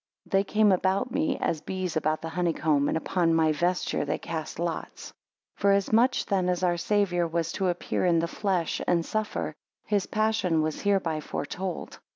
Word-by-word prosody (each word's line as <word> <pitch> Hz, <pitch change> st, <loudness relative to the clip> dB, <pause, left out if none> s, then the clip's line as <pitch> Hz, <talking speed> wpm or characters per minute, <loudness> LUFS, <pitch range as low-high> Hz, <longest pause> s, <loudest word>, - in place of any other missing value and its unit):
They 195 Hz, -1 st, +2 dB
came 210 Hz, 0 st, +3 dB
about 190 Hz, +6 st, +1 dB
me, 295 Hz, -1 st, 0 dB
as 155 Hz, -, -1 dB
bees 185 Hz, 0 st, -3 dB
about 155 Hz, 0 st, 0 dB
the 165 Hz, -, -3 dB
honey 175 Hz, 0 st, 0 dB
comb: 145 Hz, -3 st, +1 dB
and, -, -, +1 dB
Upon 165 Hz, 0 st, +1 dB
my 160 Hz, -1 st, +3 dB
vesture 175 Hz, +3 st, 0 dB
they 145 Hz, -, -1 dB
cast 160 Hz, -2 st, -5 dB
lots. 170 Hz, -1 st, -4 dB
6 -, -, -20 dB, 0.4 s
Forasmuch 210 Hz, +5 st, +3 dB
then 185 Hz, -3 st, +1 dB
as 180 Hz, 0 st, -1 dB
our 175 Hz, -1 st, +3 dB
Saviour 175 Hz, -1 st, +1 dB
was 165 Hz, 0 st, -1 dB
to 190 Hz, -, -1 dB
appear 175 Hz, -, -2 dB
in 170 Hz, -1 st, +4 dB
the 165 Hz, +1 st, +1 dB
flesh 185 Hz, -3 st, -1 dB
and 170 Hz, -2 st, +2 dB
suffer, 215 Hz, -1 st, -2 dB, 0.3 s
his 205 Hz, -3 st, 0 dB
passion 215 Hz, -7 st, +1 dB
was 155 Hz, -1 st, -2 dB
hereby 190 Hz, -6 st, +1 dB
foretold. 175 Hz, +5 st, -5 dB
180 Hz, 180 wpm, -27 LUFS, 165-200 Hz, 0.4 s, in